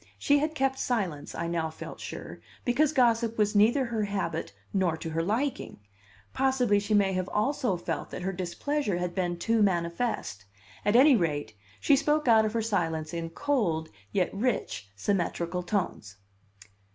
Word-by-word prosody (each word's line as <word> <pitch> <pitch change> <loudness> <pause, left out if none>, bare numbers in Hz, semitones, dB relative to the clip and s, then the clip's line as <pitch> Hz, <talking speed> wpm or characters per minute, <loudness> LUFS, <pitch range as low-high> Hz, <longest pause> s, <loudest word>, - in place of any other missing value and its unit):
She 285 0 +3
had 310 +2 -1
kept 270 -2 0
silence, 185 - -2
I 170 - -2
now 170 -1 -1
felt 160 - -9
sure, - - -7 0.3
because 275 +5 +3
gossip 235 -4 +2
was 210 0 +1
neither 235 +6 +4
her 225 -3 -1
habit 200 -1 -3 0.2
nor 185 -5 +1
to 160 0 -6
her 165 +1 0
liking. 230 - -2 0.5
Possibly 260 -6 +2
she 205 +1 0
may 195 -2 +3
have 185 0 -2
also 225 -2 0
felt 165 -3 -4
that 180 - -6
her 190 +1 -1
displeasure 195 +5 -2
had 175 0 -2
been 175 -2 -1
too 225 +5 +1
manifest; 170 - -1 0.4
at 205 - +3
any 270 +3 +7
rate, 145 - -1 0.3
she 285 - +4
spoke 300 +1 +1
out 220 -2 +6
of 215 - -2
her 230 -1 0
silence 165 -7 -1
in 165 -1 -3
cold, 165 - 0 0.2
yet 185 -2 0
rich, 195 - -2
symmetrical 175 - -1
tones. 175 - -3
205 Hz, 165 wpm, -28 LUFS, 170-245 Hz, 0.5 s, any